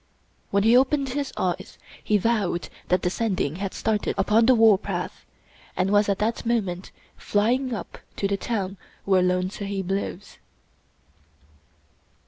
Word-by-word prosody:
When 200 0 +2
he 225 +2 +5
opened 270 +2 +3
his 280 +2 -3
eyes 180 -2 -2 0.3
he 210 - +3
vowed 205 -5 0 0.2
that 180 0 +1
the 180 - +1
Sending 185 -9 -1
had 195 0 -3
started 215 -2 -1
upon 215 +4 +3
the 255 - +6
warpath, 220 -3 +2 0.5
and 185 +2 +1
was 205 0 +4
at 200 - +1
that 220 +2 -1
moment 195 -6 -1 0.3
flying 245 +6 +1
up - - -8 0.2
to 200 - 0
the 200 - 0
town 195 -2 -3 0.3
where 190 -2 +4
Lone 180 +1 +1
Sahib 195 -2 -4
lives. 195 -1 -4
205 Hz, 140 wpm, -25 LUFS, 190-230 Hz, 0.5 s, the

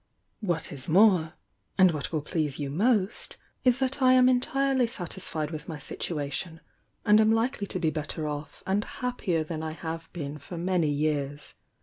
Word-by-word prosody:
What 175 -7 -2
is 140 +2 -5
more, 180 -3 +5 0.4
and 185 -1 +7
what 150 -3 -4
will 155 -3 -1
ple»! 165 +2 -3
e 150 - 0
you 140 -2 -3
most, 205 - +1 0.3
IS 250 -1 +4
that 270 +1 -1
I 255 0 +6
am 255 -1 +6
entirely 260 0 +2
satisfied 175 - -4
with 155 0 -6
n. 155 -2 -5
situ 155 +2 -4
ation 160 +4 -4 0.5
and 210 0 +6
am 220 0 +4
likely 225 -2 0
to - - -2
be 165 -3 +1
better 155 0 -3
off 145 0 -6
and 200 +2 +1
happier 205 -12 -2
than 155 0 -5
I 160 0 -4
have 165 0 -6
been 150 -3 -5
for 170 +5 -8
many 175 -2 +1
years. 145 -1 -1
170 Hz, 185 wpm, -28 LUFS, 155-220 Hz, 0.5 s, and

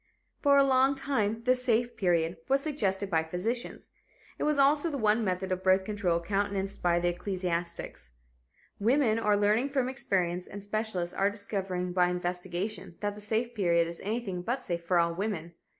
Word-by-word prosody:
For 280 -1 +5
a 275 - +7
long 265 0 +4
time 230 -5 -1
the 255 +1 +4
"safe 245 -1 +1
period" 170 -2 +1
was 275 +1 +3
suggested 200 -10 -1
by 160 -2 +3
physicians. 200 +10 -4 0.5
It - - 0
was 300 -1 +2
also 290 +4 +4
the 290 - -3
one 220 -1 +2
method 185 -1 -2
of 185 0 -1
birth 190 0 +4
control 190 -4 0
countenanced 195 +2 -2
by 175 -1 +3
the 175 0 +1
ecclesiastics. 175 - -4 0.7
Women 230 0 +3
are 210 -2 +2
learning 210 +6 +2
from 270 -2 0
experience 180 -8 -1
and 200 0 -8
specialists 205 -4 -2
are 195 +1 +2
discovering 195 -3 -3
by 180 -1 +3
investigation 180 +2 -3
that 205 -1 -1
the 210 - -11
"safe 225 +3 -1
period" 170 -4 +2
is 170 0 -7
anything 205 -4 -3
but 245 +8 -2
safe 170 -2 -3
for 175 +1 +1
all 170 0 +2
women. 175 -3 -3
200 Hz, 175 wpm, -29 LUFS, 180-235 Hz, 0.7 s, a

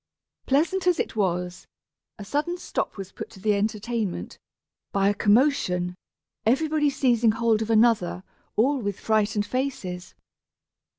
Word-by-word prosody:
Pleasant 340 +7 +1
as 355 -2 +3
it - - -2
was, 180 -3 -2 0.5
a 205 - -8
sudden 300 - -1
stop - - -3
was 195 -1 -7
put - - -8
to - - -14
the 210 +2 +2
entertainment, 210 - -2 0.5
by 195 0 +2
a - - +2
commotion, 205 -6 +2 0.5
everybody 295 +5 +2
seizing 240 -5 +2
hold 225 -1 +1
of 220 - -3
another, 220 -5 +3 0.3
all 270 +6 +2
with 205 -2 -3
frightened 215 -1 +1
faces. 205 -8 -4
220 Hz, 130 wpm, -25 LUFS, 200-265 Hz, 0.5 s, as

